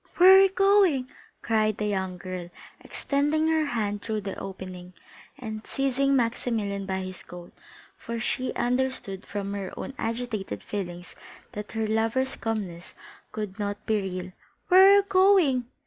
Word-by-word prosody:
"Where 370 +2 +9
are - - +9
you 390 - +5
going?" 390 -9 +3 0.3
cried 215 -2 +1
the 210 - -2
young 190 -3 -2
girl, 180 -1 -6 0.3
extending 295 +3 0
her 315 -1 +2
hand 210 -5 -2
through 220 -2 -3
the 195 -1 -5
opening, 185 -1 -8 0.4
and 220 -5 -6
seizing 275 0 +1
Maximilian 225 -5 -1
by 190 0 -2
his 185 -1 -7
coat, 175 -1 -12 0.5
for 230 0 -5
she 255 +2 -2
understood 245 -6 -2
from 200 -1 -4
her 200 -2 -4
own - - -6
agitated 225 -3 -3
feelings 175 -3 -6 0.4
that 210 +1 -7
her 220 -1 -1
lover's 225 +5 0
calmness 195 -7 -5 0.4
could 210 -2 -5
not 205 0 -4
be 215 -2 +1
real; 185 -1 -5 0.4
"where 380 +1 +8
are 400 - +8
you 405 - +5
going?" 370 -10 +4
220 Hz, 150 wpm, -26 LUFS, 195-270 Hz, 0.5 s, Where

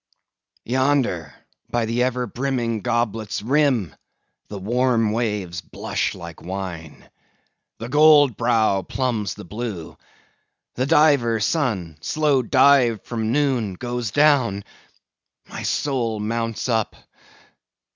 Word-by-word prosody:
Yonder, 130 - 0 0.4
by 120 -1 0
ever 125 +2 0
brimming 120 -1 -2
goblet's 110 -2 -2
rim, 130 - +1 0.5
the 105 - -7
warm 115 +2 +1
waves 105 -7 -2
blush - - -3
like 85 -1 -10
wine. 90 -4 -7 0.7
The 115 - -6
gold 145 -2 +5
brow 110 -4 +2
plumbs 115 -5 -2
the 105 - -10
blue. 105 -4 -6 0.8
The 130 +2 -1
diver 140 -7 +4
sun—slow 125 - 0
dived 125 -3 +4
from 110 -2 -2
noon—goes 120 -4 -1
down; 130 -7 +3 0.8
my - - -7
soul 120 -6 -1
mounts 115 +2 -2
up! 110 -3 0
115 Hz, 95 wpm, -22 LUFS, 105-130 Hz, 0.8 s, gold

